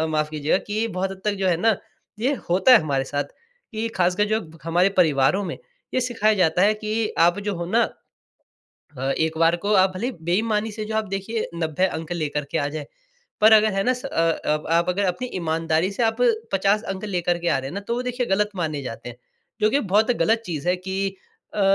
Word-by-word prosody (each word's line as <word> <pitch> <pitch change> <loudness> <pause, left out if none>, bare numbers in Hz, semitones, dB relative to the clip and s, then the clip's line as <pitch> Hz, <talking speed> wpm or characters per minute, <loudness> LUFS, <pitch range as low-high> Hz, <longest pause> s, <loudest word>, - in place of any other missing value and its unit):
माफ़ 155 -1 0
कीजिएगा 155 +4 +1
कि 215 +2 0
बहुत 190 -1 -2
हद 190 0 -9
तक 210 -1 +1
जो 190 - +2
है 170 - +3
ना, 220 +4 +2 0.4
ये 265 +6 +1 0.2
होता 190 +9 +5
है 240 - +10
हमारे 135 -3 -1
साथ 145 +1 -2 0.5
कि 225 0 -3
ख़ासकर 180 +3 +2
जो 220 +1 0 0.2
हमारे 175 +3 +3
परिवारों 160 +2 +3
में - - -4 0.4
ये 255 - +2
सिखाया 225 -3 +1
जाता 180 -1 +2
है 210 +1 +4
कि 215 +1 -2
आप 175 +3 +4
जो 200 - 0
हो 170 - -3
न 235 - +4 1.1
अ, - - -6 0.2
एक 160 0 0
बार 165 +1 +4
को 200 +4 -1
आप 190 - +4
भले 215 +6 -3
ही - - -2
बेईमानी 210 +5 0
से 215 0 -5
जो 220 0 -4
आप 220 0 0
देखिये 195 +3 -3
90 165 +2 0
अंक 160 -3 -4
लेकर 150 -3 -2
के - - 0
आ 145 - 0
जाएँ, 150 -1 -5 0.6
पर 215 +1 +7
अगर 215 -1 +6
है 195 - +1
न - - +4
स 250 - -10
अ - - -3 0.4
अ, 150 0 +1
आप 170 +1 +3
अगर 195 +3 +1
अपनी 190 +8 -2
ईमानदारी 165 +1 0
से 235 - -2
आप 225 0 +2 0.4
50 200 +3 +2
अंक 190 - -7
लेकर 175 -3 0
के 175 0 -2
आ 140 - +2
रहे 135 0 -5
हैं 155 - -8
ना 200 - -3
तो 235 - 0
वो 250 - -2
देखिए 250 -1 -2
गलत 210 +2 +1
माने 155 -5 -2
जाते 120 -1 -7
हैं। 120 - -9 0.4
जो 215 0 +3
कि 280 - +2
बहुत 210 +4 +2
गलत 225 +1 +2
चीज़ 165 0 -3
है 180 - +3
कि 190 +2 -2 0.5
अ, 210 - -1
190 Hz, 230 wpm, -23 LUFS, 165-215 Hz, 1.1 s, है